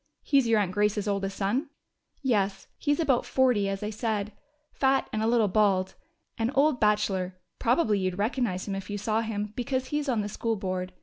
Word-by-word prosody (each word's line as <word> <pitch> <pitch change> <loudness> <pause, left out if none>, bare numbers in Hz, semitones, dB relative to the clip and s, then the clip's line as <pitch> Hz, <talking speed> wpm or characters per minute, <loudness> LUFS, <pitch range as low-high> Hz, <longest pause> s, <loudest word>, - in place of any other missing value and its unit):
"He's 275 -4 +3
your 225 -1 +4
aunt 195 -3 0
Grace's 210 +1 +1
oldest 195 -1 -1
son?" 240 +10 0 0.5
"Yes. 200 -6 0
He's 290 0 +1
about 275 -7 +2
forty, 245 -7 +2
as 195 +1 -3
I 210 - -2
said. 215 -2 -2 0.4
Fat 270 0 +2
and 215 - 0
a 220 - +1
little 230 -2 +3
bit 185 - -6
bald. 195 -3 +2 0.5
An 225 +1 +1
old 280 -1 +3
bachelor. 195 -3 +1 0.2
Probably 230 -4 +2
you'd 185 -1 -1
recognize 210 -3 -1
him 200 - -2
if 195 0 -5
you 205 - -3
saw 215 +2 0
him, 210 -2 -3
because 255 +1 -2
he's 295 -1 -1
on 235 -4 +1
the 205 - -3
School 225 +2 -2
Board. 185 -2 -3
210 Hz, 195 wpm, -27 LUFS, 195-245 Hz, 0.5 s, your